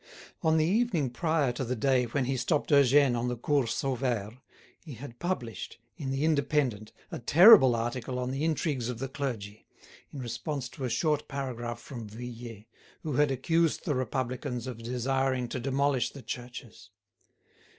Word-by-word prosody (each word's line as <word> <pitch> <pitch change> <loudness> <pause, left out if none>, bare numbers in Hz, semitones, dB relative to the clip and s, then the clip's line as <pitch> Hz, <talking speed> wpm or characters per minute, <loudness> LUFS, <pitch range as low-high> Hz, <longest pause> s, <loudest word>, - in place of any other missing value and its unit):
On 160 -1 +3
the 155 - +3
evening 180 - +1
prior 155 0 +1
to 120 +2 -4
the 125 +1 -2
day 130 +1 +2
when 125 +3 -1
he 135 +1 -1
stopped 150 +5 0
Eugène 140 -2 +5
on 120 +1 -1
the 125 0 -2
Cours 130 -1 +1
Sauvaire, 125 -4 -2 0.4
he 150 -6 -9
had 120 0 -10
published, 155 -11 -4 0.2
in 140 -3 -5
the 135 +2 -1
"Indépendant," 140 -8 +1 0.2
a - - -4
terrible 160 - +8
article 120 +2 -3
on 125 0 -2
the 135 +3 -2
intrigues 150 -6 -1
of 125 - -4
the 135 +3 -3
clergy, 115 -7 -5 0.4
in - - -9
response 130 +2 -4
to 130 - -6
a - - -1
short 150 +3 0
paragraph 120 -4 -4
from 120 -4 -8
Vuillet, 115 -1 -8 0.4
who 155 - -3
had 145 +2 +3
accused 160 +5 +1
the 155 - +1
Republicans 130 0 -3
of 125 -3 -6
desiring 130 +1 0
to 130 - -3
demolish 135 +1 +1
the 140 - -12
churches. 120 -1 -8
130 Hz, 165 wpm, -29 LUFS, 120-145 Hz, 0.4 s, terrible